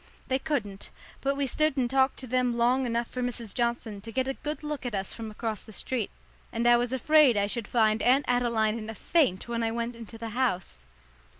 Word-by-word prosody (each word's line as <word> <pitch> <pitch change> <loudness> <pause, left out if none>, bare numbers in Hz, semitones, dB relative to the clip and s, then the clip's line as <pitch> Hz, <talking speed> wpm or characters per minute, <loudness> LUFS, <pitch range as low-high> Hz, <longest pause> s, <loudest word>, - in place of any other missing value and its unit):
They 260 0 +2
couldn't; 225 -11 -3 0.3
but 275 0 +1
we 280 - +1
stood 305 +2 +1
and 255 -2 +2
talked 265 +1 +2
to - - -6
them 250 -1 +1
long 250 +2 +3
enough 235 0 0
for 255 - -5
Mrs. 240 -4 -3
Johnson 235 -4 -1
to 225 +2 -8
get 260 +3 0
a 270 - 0
good 300 +3 -5
look 300 -2 -4
at 245 -4 -3
us 195 0 -2
from 225 -1 -6
across 215 -1 -4
the 220 - -12
street, 235 0 -2 0.4
and 235 +1 0
I 240 - +8
was 240 0 +1
afraid 270 -2 +5
I 200 - +3
should 210 +1 -3
find 220 -2 +2
Aunt 265 +3 +4
Adeline 235 -3 +2
in 215 0 -7
a 225 - -6
faint 250 - +1
when 235 -1 -2
I 225 - +1
went 235 +1 -3
into 230 0 -10
the 225 0 -5
house. 190 - -1
240 Hz, 225 wpm, -28 LUFS, 225-260 Hz, 0.4 s, I